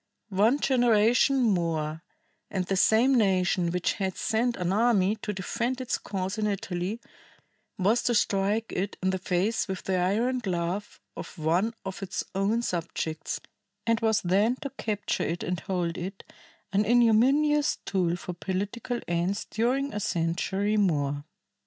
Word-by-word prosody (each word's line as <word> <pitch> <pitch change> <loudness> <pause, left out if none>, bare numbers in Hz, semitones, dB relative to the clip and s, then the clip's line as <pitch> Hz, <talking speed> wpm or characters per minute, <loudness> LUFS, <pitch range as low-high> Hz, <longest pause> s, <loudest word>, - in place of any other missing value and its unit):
"One 215 +8 +3
generation 245 +1 +3
more 165 -6 0 0.5
and 190 -3 -2
the 195 - -1
same 225 +7 +4
nation 185 -6 +2
which 180 +1 0
had 190 -3 -3
sent 235 +2 0
an 180 0 -1
army 215 -2 +3
to 210 - -4
defend 230 +6 -2
its 255 -2 -2
cause 190 +1 -3
in 210 - +1
Italy 195 +1 -3 0.8
was 210 +6 +2
to 240 - +2
strike 210 +2 +1
it 195 +2 -2
in 190 - +2
the 190 - -2
face 185 +4 0
with 190 -2 -4
the 190 -1 0
iron 225 +8 +1
glove 185 -1 -3 0.2
of - - -8
one 175 +9 +1
of 190 +1 -5
its 190 -1 -3
own 205 +5 +1
subjects, 165 -4 -3 0.5
and 230 0 +2
was 220 -2 +2
then 200 +7 +3
to 280 - -4
capture 215 -6 -2
it 170 +2 -2
and 180 -1 -2
hold 175 -1 -2
it, 190 +3 -6 0.5
an 200 +2 +3
ignominious 250 +7 +4
tool 180 -3 +1
for 180 0 -6
political 205 +7 -3
ends 175 +3 -1
during 255 +4 0
a 210 - -2
century 190 +4 0
more." 145 -7 +1
200 Hz, 150 wpm, -27 LUFS, 180-230 Hz, 0.8 s, same